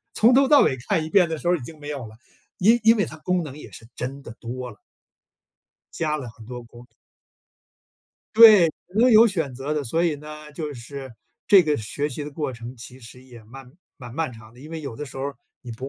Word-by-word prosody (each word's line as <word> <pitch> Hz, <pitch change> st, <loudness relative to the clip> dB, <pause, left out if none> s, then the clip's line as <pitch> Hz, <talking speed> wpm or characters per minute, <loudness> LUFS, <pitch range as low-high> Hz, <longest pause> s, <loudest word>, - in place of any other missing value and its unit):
从 230 Hz, +3 st, +5 dB
头 270 Hz, +1 st, +5 dB
到 290 Hz, 0 st, +7 dB
尾 130 Hz, -, +1 dB
看 160 Hz, -, +1 dB
一 160 Hz, -, -7 dB
遍 185 Hz, -2 st, +4 dB
的 160 Hz, -, -3 dB
时 155 Hz, -, -9 dB
候 175 Hz, -, +4 dB
已 -, -, -9 dB
经 155 Hz, +6 st, -10 dB
没 145 Hz, 0 st, -8 dB
有 140 Hz, -5 st, -5 dB
了， 110 Hz, 0 st, -14 dB, 0.4 s
因 225 Hz, +6 st, +4 dB
因 225 Hz, +1 st, +6 dB
为 205 Hz, -, +1 dB
它 155 Hz, -, -9 dB
功 180 Hz, +3 st, -1 dB
能 150 Hz, -2 st, -8 dB
也 -, -, -11 dB
是 115 Hz, -, -13 dB
真 135 Hz, +3 st, -5 dB
的 120 Hz, -, -10 dB
多 125 Hz, +1 st, -6 dB
了。 105 Hz, -, -16 dB, 1.2 s
加 155 Hz, -2 st, -1 dB
了 135 Hz, -5 st, -6 dB
很 110 Hz, 0 st, -15 dB
多 125 Hz, 0 st, -7 dB
工。 120 Hz, +1 st, -15 dB, 1.5 s
对， 215 Hz, -7 st, +8 dB, 0.2 s
所 235 Hz, +5 st, +4 dB
有 225 Hz, 0 st, +8 dB
选 165 Hz, -, -2 dB
择 135 Hz, +4 st, -4 dB
的， 150 Hz, -1 st, -1 dB
所 160 Hz, +7 st, 0 dB
以 165 Hz, -3 st, +1 dB
呢， 150 Hz, +1 st, -11 dB
就 150 Hz, -1 st, -5 dB
是， 130 Hz, +3 st, -9 dB, 0.4 s
这 195 Hz, -3 st, +7 dB
个 150 Hz, -2 st, 0 dB
学 140 Hz, +7 st, -3 dB
习 150 Hz, +1 st, -6 dB
的 150 Hz, -, -7 dB
过 145 Hz, -2 st, -4 dB
程 120 Hz, +2 st, -9 dB
其 125 Hz, +2 st, -12 dB
实 125 Hz, +2 st, -13 dB
也 120 Hz, -3 st, -14 dB
漫 125 Hz, +3 st, -13 dB, 0.2 s
蛮 120 Hz, -3 st, -11 dB
漫 160 Hz, -3 st, -2 dB
长 110 Hz, -1 st, -14 dB
的。 120 Hz, -, -17 dB
因 150 Hz, +3 st, -11 dB
为 165 Hz, -1 st, -5 dB
有 140 Hz, -6 st, -7 dB
的 150 Hz, -, -6 dB
时 135 Hz, -, -12 dB
候 135 Hz, -, -3 dB
儿， 140 Hz, 0 st, -5 dB, 0.3 s
你 125 Hz, -, -9 dB
不 130 Hz, +4 st, -7 dB
145 Hz, 255 characters per minute, -23 LUFS, 125-165 Hz, 1.5 s, 对